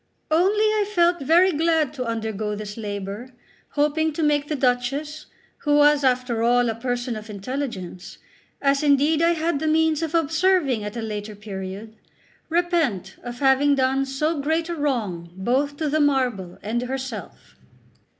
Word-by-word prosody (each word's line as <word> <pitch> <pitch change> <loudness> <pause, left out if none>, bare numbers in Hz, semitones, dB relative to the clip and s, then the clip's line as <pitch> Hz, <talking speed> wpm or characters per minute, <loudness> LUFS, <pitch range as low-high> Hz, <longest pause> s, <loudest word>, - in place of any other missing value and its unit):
Only 385 +7 +3
I 425 -1 +1
felt 345 -1 +3
very 345 +7 +4
glad 320 -2 +1
to 260 -4 -4
undergo 220 -2 -3
this 205 0 -7
labour, 205 +3 -6 0.4
hoping 300 +2 +1
to 320 - -2
make 295 -1 +2
the 305 - -2
Duchess, 275 +4 -1 0.3
who 290 -1 +1
was 295 0 +5
after 250 -3 +1
all 240 0 +3
a - - -3
person 245 +1 -3
of 215 +1 -8
intelligence, 200 -4 -5 0.5
as 275 0 +3
indeed 295 +2 +3
I 335 +1 +4
had 325 -2 -1
the 315 - -2
means 320 0 +2
of 325 0 -2
observing 325 - +2
at 210 +3 -6
a 230 - -3
later 210 -1 -5
period, 200 +1 -7 0.5
repent 325 - 0
of 245 0 -7
having 275 +1 +4
done 270 +1 +1
so 300 +4 -1
great 320 +3 0
a 340 - -2
wrong 220 - -2
both 265 +9 0
to 310 - -1
the 305 +2 +1
marble 250 -11 0
and 225 +4 -1
herself. 260 +1 -6
270 Hz, 160 wpm, -23 LUFS, 225-310 Hz, 0.5 s, was